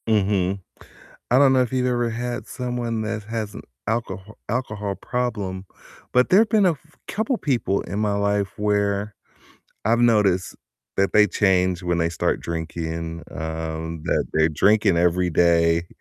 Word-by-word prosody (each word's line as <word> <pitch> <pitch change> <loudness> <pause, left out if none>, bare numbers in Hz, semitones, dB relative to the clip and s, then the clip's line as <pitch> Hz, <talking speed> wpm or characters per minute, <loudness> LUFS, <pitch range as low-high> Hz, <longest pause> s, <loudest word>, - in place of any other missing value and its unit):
Mhm, 100 -3 +1 0.7
I 125 - +6
don't 140 -2 +6
know 130 - +4
if 125 0 -1
you've 125 -1 +1
ever 120 -1 +1
had 120 0 -4
someone 120 -3 -3
that 110 0 -3
has 110 -1 -4
an - - -7 0.3
alcoho 110 -3 -3 0.2
alcohol 105 -5 -2
problem, 105 -7 -3 0.5
but 125 0 +4
there 190 - +6
have 220 0 +3
been 215 -3 +4
a 180 - +5
f 155 0 -20
couple 220 +5 -1
people 120 - 0
in 100 +4 -4
my 105 -1 +1
life 100 -1 0
where 100 0 0 0.7
I've 115 +2 +3
noticed 105 -6 +3 0.4
that 95 0 +2
they 105 0 +7
change 95 -3 +2
when 85 -1 0
they 85 0 +1
start 85 - -1
drinking, 85 0 -4
um, 80 0 -4
that - - +1
they're 80 +1 +3
drinking 100 +3 +3
every 90 +1 +2
day, 85 0 +3
100 Hz, 155 wpm, -23 LUFS, 90-120 Hz, 0.7 s, they